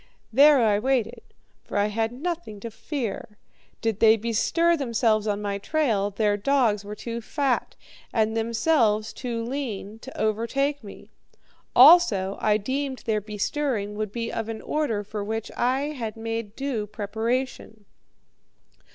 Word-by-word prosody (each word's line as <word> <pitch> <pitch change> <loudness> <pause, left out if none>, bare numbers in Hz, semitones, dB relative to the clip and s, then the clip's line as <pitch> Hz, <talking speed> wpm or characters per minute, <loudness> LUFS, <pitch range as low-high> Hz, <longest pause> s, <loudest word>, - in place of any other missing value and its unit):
There 285 +3 +7
I 205 -1 +3
waited, 245 -1 0 0.4
for - - -5
I 205 - +3
had 225 +1 -1
nothing 310 - -5
to 230 - -6
fear. 225 -5 -5 0.4
Did 225 -2 -1
they 225 0 +6
bestir 235 +10 +2
themselves 230 -6 +1
on 205 0 -1
my 200 -1 -2
trail, 220 -6 0
their 205 0 +1
dogs 220 -3 +2
were 205 +1 -7
too 235 +2 -5
fat, 270 +2 -1 0.4
and 220 -1 +1
themselves 225 -1 +1
too 235 -2 -4
lean, 225 -5 -5
to 265 +3 -10
overtake 235 +7 0
me; 200 - -12 0.6
also, 245 - +6
I 210 -1 +3
deemed 265 +4 -3
their 215 -2 0
bestirring 210 +1 -2
would 210 -1 -3
be 230 +1 -3
of 225 0 -3
an 225 -1 -6
order 240 -9 -1
for 210 0 -5
which 220 +1 -4
I 265 +4 0
had 230 -6 -5
made 225 -1 -4
due 260 -6 -3
preparation. 220 +1 -3
225 Hz, 145 wpm, -25 LUFS, 210-265 Hz, 0.6 s, There